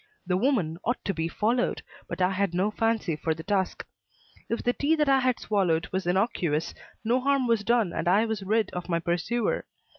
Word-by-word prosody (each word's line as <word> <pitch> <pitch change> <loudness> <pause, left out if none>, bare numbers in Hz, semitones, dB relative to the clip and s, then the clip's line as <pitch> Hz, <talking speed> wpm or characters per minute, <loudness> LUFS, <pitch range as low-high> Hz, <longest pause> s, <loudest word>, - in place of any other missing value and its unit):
The 180 - +1
woman 185 - +1
ought 245 +2 0
to 195 - 0
be 165 -1 -1
followed, 230 +8 0 0.2
but 185 - -2
I 180 - +3
had 190 -2 0
no 195 +4 +1
fancy 225 -6 0
for 160 +1 -1
the 160 - -8
task. 190 0 -1 0.6
If 230 - -2
the 245 - +2
tea 295 +5 +2
that 300 -2 +1
I 270 -1 +5
had 255 -1 +1
swallowed 180 -6 +1
was 190 -1 -2
innocuous, 175 -5 0 0.3
no 235 +3 +2
harm 275 0 +2
was 230 -3 +2
done 230 -5 +2
and - - -2
I 200 +5 +4
was 220 -2 -3
rid 215 +1 +1
of 180 0 -6
my 170 - +2
pursuer. 175 +8 -1
205 Hz, 205 wpm, -27 LUFS, 175-235 Hz, 0.6 s, I